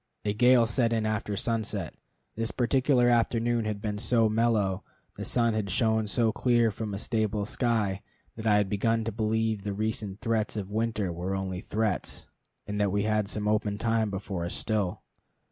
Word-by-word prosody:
A 105 - +1
gale 125 +2 +5
set 115 +1 +1
in 110 -1 0
after 105 -1 -2
sunset. 110 -7 -2 0.4
This 115 0 -1
particular 125 +1 +2
afternoon 120 -1 +2
had 105 -1 -2
been 105 0 -3
so 115 0 +3
mellow, 110 -4 +1 0.3
the - - -6
sun 115 -2 +2
had 110 -2 -2
shone 110 +3 +2
so 115 +1 +2
clear 120 -1 +2
from 105 -1 -4
a - - -3
stable 110 -1 -1
sky, 105 -4 0 0.3
that 110 0 -4
I 105 - +5
had 105 -1 +3
begun 115 +3 +1
to 115 - -2
believe 110 0 0
the 100 -1 -3
recent 105 -1 -3
threats 115 -3 -1
of 100 -1 -5
winter 110 -4 -1
were 90 +3 -3
only 95 -1 -3
threats, 110 -2 -2 0.4
and 105 0 -2
that 100 -2 +2
we 100 +1 +1
had 110 -1 +1
some 105 -1 -2
open 105 -1 +1
time 115 -1 +1
before 95 -2 -4
us 85 - -4
still. 105 -5 -1
110 Hz, 180 wpm, -28 LUFS, 100-115 Hz, 0.4 s, gale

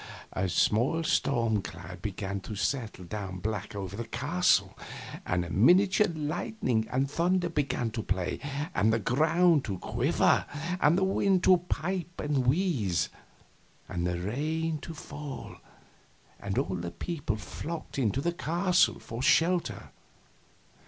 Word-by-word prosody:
A 95 0 0
small 120 - +2
storm 115 -8 +1
cloud 90 0 -9
began 100 0 -3
to 105 +2 -7
settle 110 -4 -2
down 95 -1 -5
black 105 +1 -4
over 100 -1 -5
the 115 +1 -5
castle, 130 - +2 0.5
and 90 0 +1
the 85 - -7
miniature 185 - +5
lightning 155 - -1
and 135 +2 +1
thunder 175 +4 +1
began 140 -7 -1
to 110 - -3
play, 90 -2 -2 0.3
and 105 +4 +3
the 115 - +3
ground 155 - +3
to 100 -3 -3
quiver, - - +2 0.3
and 160 +2 +4
the 190 - +2
wind 190 -1 +2
to 185 - +7
pipe 175 +1 -2
and 140 -4 0
wheeze, 125 - +1 0.8
and 90 -1 -2
the 90 -1 -1
rain 155 - -1
to 165 +2 -8
fall, 145 -1 -8 0.8
and 100 -1 -4
all 95 +2 0
the 85 0 -4
people 145 - -3
flocked 155 +9 -6
into 125 +1 +1
the 170 +3 0
castle 175 +2 +2
for 115 +2 -7
shelter. 170 +5 +2
130 Hz, 140 wpm, -29 LUFS, 100-165 Hz, 0.8 s, to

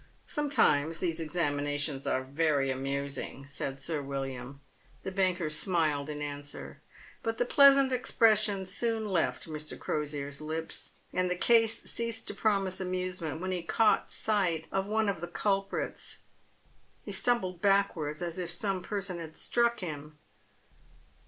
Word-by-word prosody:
" - - -35
Sometimes 165 - +2
these 165 -2 -1
examinations 145 -3 -1
are 130 - +1
very 140 0 +1
amusing," 140 +1 -3
said 135 -1 -4
Sir 150 +2 -1
"William. 135 -1 -5 0.4
The 190 - -3
banker 185 -3 +1
smiled 155 -3 +1
in 150 0 -4
answer. 145 0 -6 0.4
But 225 -3 -2
the 245 - +2
pleasant 275 0 +7
expression 215 -5 +3
soon 220 +3 0
left 180 -4 0
Mr. 155 -1 -6
Crosier' 145 -2 -2
s 140 +1 -9
lips, 160 +1 -5 0.2
and 185 0 +1
the 180 - +1
case 225 +3 +4
ceased 230 -1 -1
to - - -3
promise 195 -3 +1
amusement 180 -4 -3
when 185 0 -2
he 180 -1 -1
caught 215 +6 +3
sight 180 -7 0
of 195 0 0
one 220 +1 +1
of 195 -5 -1
the 175 - -3
culprits. 195 +2 -2 0.8
He - - -6
stumbled 185 -8 0
backwards 180 -6 +2
as 170 +1 -3
if 175 -2 -3
some 190 +2 -1
person 195 -2 -3
had 160 -1 -8
struck 235 -1 +1
him. 150 -3 -6
175 Hz, 145 wpm, -30 LUFS, 145-200 Hz, 0.8 s, pleasant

